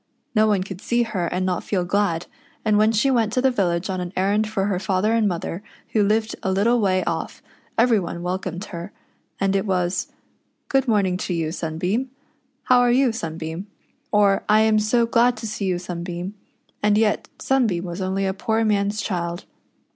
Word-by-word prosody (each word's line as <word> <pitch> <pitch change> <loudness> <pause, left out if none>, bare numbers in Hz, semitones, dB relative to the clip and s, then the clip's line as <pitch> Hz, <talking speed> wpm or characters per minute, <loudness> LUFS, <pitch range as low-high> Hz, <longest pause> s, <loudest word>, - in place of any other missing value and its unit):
No 215 -1 +4
one 200 -3 +2
could 190 -1 -8
see 240 +2 +1
her 200 -6 -2
and 180 +2 -1
not 180 -1 -1
feel 185 -4 -1
glad, 180 -3 0 0.4
and 215 -1 +3
when 215 +1 +4
she 230 +5 +2
went 230 -4 +2
to - - +2
the 265 0 +3
village 180 -6 0
on 185 -2 -2
an 175 -1 -5
errand 205 +3 +1
for 195 -3 -1
her 195 -3 0
father 195 +3 +1
and 225 -2 +3
mother, 175 0 -3 0.3
who 215 - +2
lived 220 +2 +1
a 190 - -1
little 225 +6 +3
way 185 -3 +2
off, 165 -1 -4 0.3
ever}' 230 -3 +4
one 170 0 -5
welcomed 185 +1 -3
her; 175 +1 -7 0.5
and 195 0 +1
it 195 +2 0
was: 180 -1 0 0.6
"Good 270 -1 +2
morning 200 -5 +2
to 180 -1 -3
you, 160 -2 -1
Sunbeam." 180 +10 -2 0.5
"How 250 -1 +5
are 245 0 +4
\'ou, 255 0 +4
Sunbeam? 165 -2 -5 0.2
" - - -43
or, 205 -2 +3
" - - -20
I 215 +1 +6
am 220 -1 +4
so 230 +3 +2
glad 240 +1 +3
to 220 - -6
see 215 -2 -3
you. 185 -2 +1
Sunbeam." 175 +1 -5 0.5
And 210 0 +3
yet 215 -1 +1
Sunbeam 225 -10 +1
was 175 +2 -5
only 190 +1 -1
a 190 - 0
poor 220 +2 0
man's 205 0 +1
child. 175 -2 -3
200 Hz, 200 wpm, -23 LUFS, 180-220 Hz, 0.6 s, I